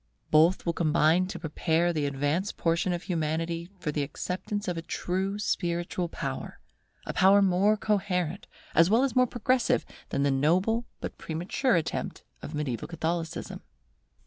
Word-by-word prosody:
Both 160 Hz, +5 st, +4 dB
will 170 Hz, -, +1 dB
combine 165 Hz, +2 st, +3 dB
to 190 Hz, -1 st, -5 dB
prepare 165 Hz, +1 st, 0 dB
the 150 Hz, -3 st, 0 dB
advanced 145 Hz, +8 st, -1 dB
portion 170 Hz, +2 st, +1 dB
of 175 Hz, +1 st, -2 dB
humanity 165 Hz, 0 st, -2 dB
for 160 Hz, -4 st, -3 dB
the 150 Hz, -, -1 dB
acceptance 185 Hz, +8 st, -4 dB
of 180 Hz, -, -1 dB
a 165 Hz, -, -3 dB
true 190 Hz, +4 st, -2 dB
spiritual 175 Hz, -3 st, -1 dB
power, -, -, -5 dB, 0.5 s
a -, -, -4 dB
power 195 Hz, +2 st, +6 dB
more 200 Hz, +2 st, +3 dB
coherent, 185 Hz, -4 st, -1 dB, 0.3 s
as 165 Hz, +2 st, +5 dB
well 230 Hz, +5 st, +4 dB
as 275 Hz, -, 0 dB
more 255 Hz, 0 st, +5 dB
progressive, 255 Hz, +1 st, +1 dB, 0.2 s
than 140 Hz, -, 0 dB
the 140 Hz, -, +3 dB
noble 185 Hz, -, +2 dB, 0.2 s
but -, -, -6 dB
premature 175 Hz, -, 0 dB
attempt 165 Hz, -, -2 dB, 0.2 s
of 155 Hz, -, -6 dB
mediaeval 135 Hz, -7 st, -3 dB
Catholicism. 165 Hz, 0 st, -3 dB
175 Hz, 150 wpm, -28 LUFS, 160-195 Hz, 0.5 s, power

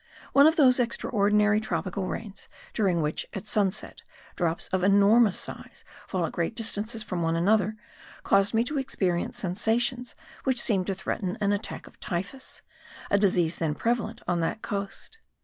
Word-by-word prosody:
One 280 Hz, +2 st, +7 dB
of 320 Hz, -, +3 dB
those 260 Hz, -5 st, +5 dB
extraordinary 210 Hz, -3 st, +2 dB
tropical 185 Hz, -1 st, -3 dB
rains 210 Hz, -1 st, -7 dB, 0.2 s
during 185 Hz, -7 st, +1 dB
which, 150 Hz, +1 st, -2 dB
at 195 Hz, -, -5 dB
sunset, 210 Hz, -1 st, -1 dB, 0.3 s
drops 170 Hz, -2 st, -1 dB
of 185 Hz, -1 st, -1 dB
enormous 200 Hz, +2 st, +5 dB
size -, -, -4 dB, 0.2 s
fall 180 Hz, -3 st, -1 dB
at -, -, -4 dB
great 170 Hz, +6 st, -2 dB
distances 225 Hz, 0 st, -1 dB
from 180 Hz, -4 st, -3 dB
one 165 Hz, 0 st, +1 dB
another, 205 Hz, +4 st, +2 dB, 0.5 s
caused 195 Hz, +1 st, +3 dB
me 225 Hz, -, +4 dB
to 285 Hz, +4 st, -2 dB
experience 185 Hz, -9 st, -1 dB
sensations 240 Hz, +7 st, 0 dB, 0.3 s
which 260 Hz, -2 st, +1 dB
seemed 195 Hz, -6 st, +2 dB
to 195 Hz, -, -1 dB
threaten 190 Hz, 0 st, -3 dB
an 205 Hz, -1 st, +1 dB
attack 205 Hz, +2 st, -4 dB
of -, -, -17 dB
typhus, 195 Hz, +9 st, -4 dB, 0.5 s
a 200 Hz, -, +4 dB
disease 175 Hz, -4 st, +2 dB
then 155 Hz, -3 st, -1 dB
prevalent 230 Hz, +1 st, -2 dB
on 175 Hz, -1 st, +1 dB
that 170 Hz, +6 st, -2 dB
coast. 200 Hz, -, -5 dB
200 Hz, 160 wpm, -27 LUFS, 180-225 Hz, 0.5 s, One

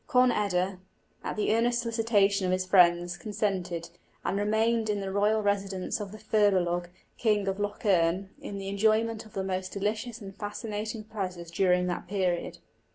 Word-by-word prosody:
Conn 250 Hz, 0 st, +5 dB
eda, 190 Hz, -3 st, 0 dB, 0.4 s
at -, -, -3 dB
the 215 Hz, 0 st, +1 dB
earnest 240 Hz, +1 st, +2 dB
solicitation 210 Hz, -4 st, +2 dB
of -, -, +1 dB
his 185 Hz, 0 st, +1 dB
friends, 175 Hz, -2 st, +4 dB
consented, 185 Hz, -5 st, -2 dB, 0.3 s
and -, -, 0 dB
remained 220 Hz, +2 st, +1 dB
in 205 Hz, -1 st, 0 dB
the 195 Hz, -1 st, -3 dB
royal 210 Hz, +2 st, +2 dB
residence 195 Hz, -2 st, -1 dB
of 205 Hz, -2 st, -5 dB
the 215 Hz, -, -9 dB
Firbolg, 185 Hz, -5 st, +2 dB, 0.3 s
King 210 Hz, -3 st, +2 dB
of 195 Hz, +1 st, -1 dB
Lough 205 Hz, 0 st, -2 dB
Erne, 185 Hz, 0 st, +2 dB
in 200 Hz, -, -6 dB
the 195 Hz, 0 st, -5 dB
enjoyment 220 Hz, +2 st, +1 dB
of -, -, -20 dB
the 195 Hz, -, -2 dB
most 185 Hz, -1 st, -3 dB
delicious 215 Hz, +4 st, -2 dB
and 195 Hz, -3 st, -9 dB
fascinating 215 Hz, +1 st, -4 dB
pleasures 185 Hz, -6 st, -5 dB
during 180 Hz, 0 st, +3 dB
that 180 Hz, -1 st, -3 dB
period. 185 Hz, -3 st, -1 dB
200 Hz, 165 wpm, -28 LUFS, 185-215 Hz, 0.4 s, Conn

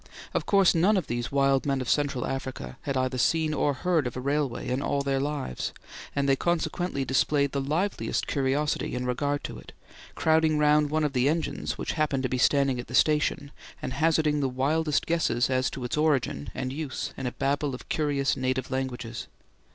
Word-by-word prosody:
Of -, -, -1 dB
course 195 Hz, -3 st, +5 dB
none 190 Hz, +6 st, +3 dB
of 185 Hz, -, -1 dB
these 120 Hz, 0 st, -3 dB
wild 135 Hz, 0 st, +2 dB
men 135 Hz, -1 st, +1 dB
of 130 Hz, -, -4 dB
Central 140 Hz, -3 st, +1 dB
Africa 130 Hz, -, -5 dB
had 140 Hz, -2 st, -2 dB
either 130 Hz, 0 st, 0 dB
seen 160 Hz, +4 st, +2 dB
or 145 Hz, -1 st, +1 dB
heard 165 Hz, -4 st, +1 dB
of 125 Hz, -, -6 dB
a -, -, -2 dB
railway 140 Hz, -1 st, -1 dB
in 130 Hz, +2 st, -1 dB
all 140 Hz, 0 st, 0 dB
their 135 Hz, -1 st, 0 dB
lives, 140 Hz, -, -3 dB, 0.4 s
and 140 Hz, -1 st, +1 dB
they 135 Hz, -, +4 dB
consequently 170 Hz, -2 st, -1 dB
displayed 140 Hz, +2 st, +2 dB
the 140 Hz, -, -1 dB
liveliest 165 Hz, +9 st, -1 dB
curiosity 140 Hz, 0 st, 0 dB
in 125 Hz, 0 st, -2 dB
regard 145 Hz, +3 st, -1 dB
to -, -, -6 dB
it, -, -, -14 dB, 0.4 s
crowding 160 Hz, -1 st, +3 dB
round 150 Hz, 0 st, +4 dB
one 155 Hz, +1 st, +1 dB
of 150 Hz, -2 st, 0 dB
the 130 Hz, +1 st, +3 dB
engines 165 Hz, +1 st, -2 dB
which -, -, -3 dB
happened 150 Hz, -4 st, 0 dB
to 130 Hz, -, 0 dB
be 130 Hz, -, -1 dB
standing 135 Hz, -1 st, +3 dB
at 120 Hz, -, -6 dB
the 120 Hz, -, -4 dB
station, 150 Hz, 0 st, +2 dB, 0.3 s
and 130 Hz, -, -4 dB
hazarding 155 Hz, 0 st, +2 dB
the 135 Hz, -2 st, +1 dB
wildest 150 Hz, +4 st, +1 dB
guesses 165 Hz, -7 st, +1 dB
as 130 Hz, 0 st, +2 dB
to 130 Hz, -, -7 dB
its 125 Hz, -, -2 dB
origin 140 Hz, -, +1 dB
and 130 Hz, 0 st, -3 dB
use 145 Hz, -2 st, -4 dB
in 135 Hz, -, -4 dB
a -, -, -2 dB
babel 140 Hz, 0 st, -1 dB
of -, -, -12 dB
curious 145 Hz, -2 st, 0 dB
native 130 Hz, 0 st, -2 dB
languages. 125 Hz, -3 st, -4 dB
140 Hz, 200 wpm, -27 LUFS, 130-150 Hz, 0.4 s, course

